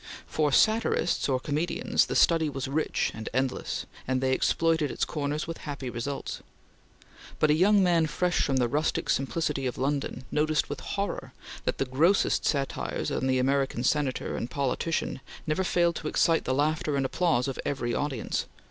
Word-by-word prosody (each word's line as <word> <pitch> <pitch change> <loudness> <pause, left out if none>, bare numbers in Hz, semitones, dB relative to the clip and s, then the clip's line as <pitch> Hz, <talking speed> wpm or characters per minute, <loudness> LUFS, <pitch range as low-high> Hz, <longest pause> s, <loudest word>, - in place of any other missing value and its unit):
For 150 -2 0
satirists 215 -4 +2
or 130 -1 +2
comedians, 150 +6 0
the - - -3
study 165 -2 +4
was 135 -1 -4
rich 150 +4 0
and 110 0 -6
endless, 130 0 -1 0.2
and 130 0 +1
they 130 0 +1
exploited 165 +2 +2
its - - -1
corners 150 0 -2
with 165 0 -6
happy 140 -4 -5
results, 130 +4 -4 1.0
but 155 - +3
a - - +6
young 195 +5 +5
man 170 -3 +3
fresh 175 +3 0
from 135 -2 +1
the 125 -2 +3
rustic 150 +6 0
simplicity 140 -1 -1
of 125 - -4
London 135 -1 -2
noticed 150 -1 +1
with 145 - -4
horror 200 0 -4 0.3
that - - 0
the 135 - 0
grossest 160 +10 +2
satires 140 -2 -1
on 130 - -1
the 130 0 +2
American 135 -1 +1
Senator 135 -1 0
and 120 - -3
politician 140 +2 -1 0.2
never 155 +4 0
failed 170 -2 +2
to 155 - -5
excite 165 +1 +2
the 130 - 0
laughter 150 +1 +1
and 135 - +1
applause 140 -3 +1
of 135 - -4
every 120 -4 -2
audience. 140 -6 -2
145 Hz, 170 wpm, -28 LUFS, 130-160 Hz, 1.0 s, a